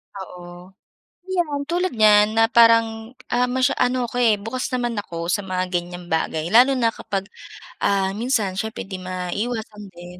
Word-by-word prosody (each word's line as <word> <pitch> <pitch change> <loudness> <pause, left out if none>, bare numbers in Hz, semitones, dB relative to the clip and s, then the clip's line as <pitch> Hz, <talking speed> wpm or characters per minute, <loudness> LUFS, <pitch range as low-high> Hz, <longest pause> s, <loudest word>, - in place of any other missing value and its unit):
Oo. 180 -1 -10 0.5
'Yan 345 -6 -2
tulad 350 +4 -1
niyan 210 0 +5
na 225 - +5
parang, 230 0 +3 0.2
ah, 245 +1 +2
masya 255 0 +1
ano 250 0 +1
ako, 240 - -6
eh, 225 -4 +4
bukas 225 +5 -4
naman 240 -1 -1
ako 170 -3 -5
sa - - +1
mga 185 -2 -3
ganyang 175 0 -4
bagay 160 0 -1
lalo 255 +4 +6
na 235 -3 +2
kapag, 195 -1 -4 0.6
ah, 195 -1 +1
minsan 215 -5 -1
syempre 220 +2 -4
hindi 190 -2 -6
maiiwasan 210 +4 -4
din. 175 +1 -12
215 Hz, 160 wpm, -22 LUFS, 185-245 Hz, 0.6 s, lalo